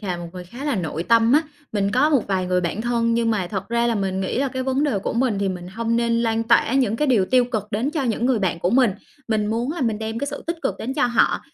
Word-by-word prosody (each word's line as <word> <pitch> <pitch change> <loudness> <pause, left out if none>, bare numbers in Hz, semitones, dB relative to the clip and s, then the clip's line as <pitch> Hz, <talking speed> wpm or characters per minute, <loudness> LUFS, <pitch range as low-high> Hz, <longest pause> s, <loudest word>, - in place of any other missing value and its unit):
là 185 -5 -3
một 175 0 -7
người 180 -1 -8
khá 240 +10 -9
là 290 -4 0
nội 165 -2 -3
tâm 230 +3 +4
á. 305 +3 +5 0.3
Mình 200 -2 0
có 260 +6 +3
một 275 -6 +2
vài 185 -2 0
người 180 0 +1
bạn 175 +5 -2
thân 230 0 +1
nhưng 230 -1 +1
mà 195 -5 0
thật 195 +1 -5
ra 235 0 +1
là 235 - +1
mình 190 -2 -1
nghĩ 190 +5 -2
là 275 0 +1
cái 260 0 -4
vấn 265 +2 0
đề 230 -9 +1
của - - -3
mình 235 -4 +1
thì 200 -1 0
mình 180 -1 -5
hông 230 +3 -1
nên 235 0 +1
lan 225 0 +1
tỏa 235 +2 +3
những 240 -5 +2
cái 300 - +1
điều 225 -8 +3
tiêu 250 +4 +4
cực 235 -5 -2
đến 235 +8 -1
cho 305 -2 -2
những 235 -1 0
người 255 -3 +2
bạn 185 -4 -1
của 175 - 0
mình. 245 -1 +4 0.4
Mình 215 -2 +1
muốn 235 +6 -1
là 340 - -6
mình 225 -4 0
đem 225 +1 -4
cái 285 - -2
sự 285 0 -6
tích 335 +1 -2
cực - - 0
đến 260 +4 -4
cho 290 -3 +2
họ, 240 -1 +2
230 Hz, 300 wpm, -22 LUFS, 200-255 Hz, 0.4 s, á